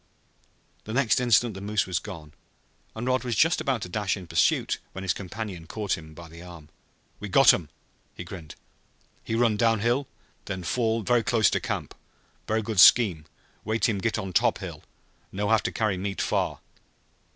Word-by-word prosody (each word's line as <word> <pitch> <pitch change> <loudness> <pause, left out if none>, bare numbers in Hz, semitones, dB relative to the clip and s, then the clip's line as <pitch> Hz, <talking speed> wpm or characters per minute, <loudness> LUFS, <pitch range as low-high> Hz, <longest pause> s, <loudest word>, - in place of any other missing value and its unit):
The 110 - -6
next 130 -1 +2
instant 120 -1 +3
the 95 - -8
moose 105 +1 0
was 90 -2 -1
gone 80 -7 -10 0.6
and 110 +2 -5
Rod 130 0 +1
was 120 -2 -2
just 160 +9 +3
about 135 -8 -1
to - - -5
dash 105 0 -1
in 95 - -9
pursuit - - +1
when 95 - -7
his 95 - +1
companion 95 -3 -7
caught 105 +1 -2
him 80 -1 -12
by 85 +1 -11
the 85 +1 -13
arm. 85 -4 -12 0.5
"We 105 - -6
got 135 +8 +7
um!" 80 -5 -3 0.5
he - - -7
grinned. 85 -4 -10 0.7
"He 115 - -3
run 115 -2 +2
downhill, 115 +4 +1 0.4
then 95 -2 -5
fall 115 +4 0
ver' 120 +4 +2
close 115 -1 +2
to - - +1
camp. - - -4 0.5
Ver' 110 +1 +1
good 105 -3 -2
scheme 90 -5 +6 0.4
wait 110 +2 0
heem 105 -4 0
git 115 +3 -1
on 95 -1 -5
top - - +3
hill. - - -8 0.5
No 100 +1 -2
have 110 -2 +4
to - - -3
carry 105 -4 -1
meat 100 0 -4
far!" - - -1
105 Hz, 185 wpm, -26 LUFS, 90-115 Hz, 0.7 s, got